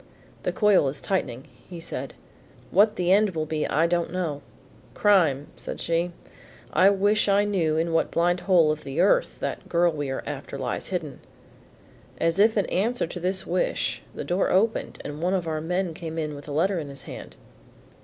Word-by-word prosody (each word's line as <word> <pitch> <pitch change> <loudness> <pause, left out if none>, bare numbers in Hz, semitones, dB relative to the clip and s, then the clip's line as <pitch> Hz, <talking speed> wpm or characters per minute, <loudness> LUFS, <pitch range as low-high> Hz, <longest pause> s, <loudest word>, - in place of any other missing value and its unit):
"The - - -1
coil 205 -9 +4
is 140 +1 -7
tightening," 135 -10 -2 0.4
said 165 - -6
he. - - -27
"What 210 +2 +5
the 180 -2 +1
end 200 -2 +4
will 155 -1 -1
be 155 0 -2
I 160 +3 +2
don't 170 -1 0
know. 165 -6 -2 0.5
Crime, 165 -9 +3
said - - -7
she? 170 +1 0 0.6
I 185 +4 +6
wish 205 +1 +2
I 200 +1 +4
knew 170 -7 +1
in 165 +1 0
what 165 - +2
blind 175 +1 +1
hole 175 -5 +4
of 155 0 -4
the 135 +1 -4
earth - - +3
that - - -4
girl 175 0 +3
we 145 -3 -4
are 135 - -3
after - - -6
lies - - -3
hidden." - - -4 1.0
As 165 +3 +1
if 220 +2 +5
in 205 - +2
answer 230 +6 0
to 175 - -7
this 185 +2 -1
wish - - -1
the - - -4
door 180 +2 0
opened 215 +5 +1
and 145 +1 -6
one 180 +3 +1
of 175 -3 -2
our 155 -1 -2
men 180 +1 -1
came 160 0 -7
in 155 -2 -2
with 145 0 -10
a - - -6
letter 175 +5 +1
in 150 -3 -6
his 140 0 -10
hand. - - -9
175 Hz, 195 wpm, -25 LUFS, 155-195 Hz, 1.0 s, I